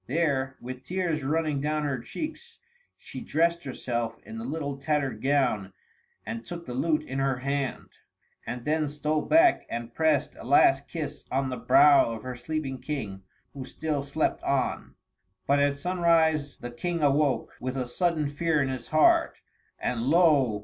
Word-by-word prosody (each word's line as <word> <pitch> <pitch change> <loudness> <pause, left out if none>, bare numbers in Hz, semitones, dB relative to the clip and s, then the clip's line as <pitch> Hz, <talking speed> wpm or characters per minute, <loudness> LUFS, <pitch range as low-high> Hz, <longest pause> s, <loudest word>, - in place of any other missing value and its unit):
There, 135 -2 0
with 130 +1 -7
tears 175 -4 -1
running 150 0 0
down 150 +1 -1
her 140 -3 -1
cheeks, 320 - -7 0.4
she - - -9
dressed 170 +1 +1
herself 120 -3 -3
in 225 0 -7
the 225 - -6
little 145 - -3
tattered 140 -6 -1
gown 130 -9 +1 0.5
and 115 0 -5
took 170 +8 -8
the 125 - -6
lute 155 +4 +1
in 135 -2 -4
her 135 -1 +1
hand, 140 +1 -3 0.6
and 120 +1 -5
then 155 0 +1
stole 150 +1 -1
back 330 - +4
and 115 0 -5
pressed 155 -2 +1
a - - -9
last 135 +2 +4
kiss 160 -4 -5
on 135 0 0
the 130 - -3
brow 145 -5 +6
of 110 - -8
her 130 0 -5
sleeping 135 0 -4
King, 120 -9 -4 0.3
who 135 - -6
still 150 +2 -3
slept 140 +3 -1
on. 135 -2 -1 0.5
But 140 +1 +3
at 140 0 +2
sunrise 160 -4 +2
the 120 - -7
King 170 +6 -3
awoke, 145 -1 +2
with 130 +1 -4
a 130 - -1
sudden 160 +2 0
fear 155 +2 0
in 135 -2 +1
his 130 -3 -5
heart, 155 0 +4 0.4
and 120 -2 -2
lo! 140 -6 +3
145 Hz, 165 wpm, -27 LUFS, 130-160 Hz, 0.6 s, brow